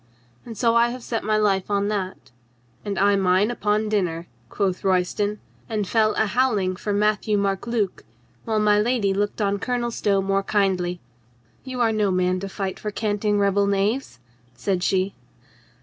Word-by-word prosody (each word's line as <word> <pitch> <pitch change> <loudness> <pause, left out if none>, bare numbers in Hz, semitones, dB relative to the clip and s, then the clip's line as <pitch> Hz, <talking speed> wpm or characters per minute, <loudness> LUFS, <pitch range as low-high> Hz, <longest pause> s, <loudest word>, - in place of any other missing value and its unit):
And 225 -2 -8
so 230 +1 +3
I 235 0 +4
have 250 0 -7
set 230 -1 -3
my 215 0 +1
life 200 -3 +1
on 200 0 +1
that." 190 -8 -4 0.5
"And 200 -2 -3
I 200 +1 +4
mine 190 +3 +2
upon 215 -2 0
dinner," 175 -6 -1 0.2
quoth 190 - -1
Royston, 195 +3 0 0.3
and 210 -3 -1
fell 215 +1 +2
a - - +2
howling 210 -5 +1
for 210 - -3
Matthieu 210 +1 +1
Marc 200 +2 -1
Luc, 220 -5 -1 0.4
while 220 -1 0
my 210 -1 +4
lady 220 -4 +1
looked 205 +2 -1
on 200 0 0
Colonel 240 0 -1
Stow 200 -3 +1
more 195 0 +1
kindly. 185 -3 0 0.6
"You 255 -2 -4
are 230 -1 +3
no 210 -2 +1
man 185 0 +1
to 195 +1 -5
fight 190 -1 -4
for 210 - -3
canting 210 0 0
rebel 200 0 +2
knaves," 200 - 0 0.4
said 180 +8 -1
she. 190 +1 +1
205 Hz, 170 wpm, -23 LUFS, 195-215 Hz, 0.6 s, I